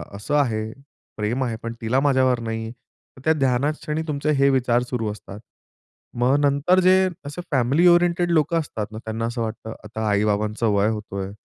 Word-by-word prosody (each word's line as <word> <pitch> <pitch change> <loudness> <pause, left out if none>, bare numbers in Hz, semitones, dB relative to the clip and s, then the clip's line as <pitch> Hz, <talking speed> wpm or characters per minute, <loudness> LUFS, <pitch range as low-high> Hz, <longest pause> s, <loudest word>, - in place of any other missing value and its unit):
असं 105 +9 -3
आहे, 110 -5 0 0.5
प्रेम 115 +5 -1
आहे 115 -3 -2
पण 115 0 -4
तिला 120 +4 +1
माझ्यावर 130 -3 +2
नाही." 115 0 -4
तर 130 +2 -22
त्या 160 - +4
ध्यानात 135 +1 +1
क्षणी 155 0 -2
तुमचे 150 0 -1
हे 140 0 +5
विचार 125 -2 +2
सुरू 115 -4 -2
असतात. 105 -1 -10 0.8
मग 130 +4 +3
नंतर 145 +6 +3
जे 185 +1 +4 0.2
असे 145 +5 -6
फॅमिली 140 +7 +3
ओरिएंटेड 175 0 +3
लोकं 165 +1 +2
असतात 110 -8 -4
ना 110 - -8
त्यांना 110 +1 -3
असं 120 +1 -3
वाटतं, 110 0 -5
"आता 110 0 -4
आई-बाबांचं 105 +2 0
वय 100 +1 +2
होतोय." 100 -3 -5
125 Hz, 175 wpm, -23 LUFS, 110-145 Hz, 0.8 s, हे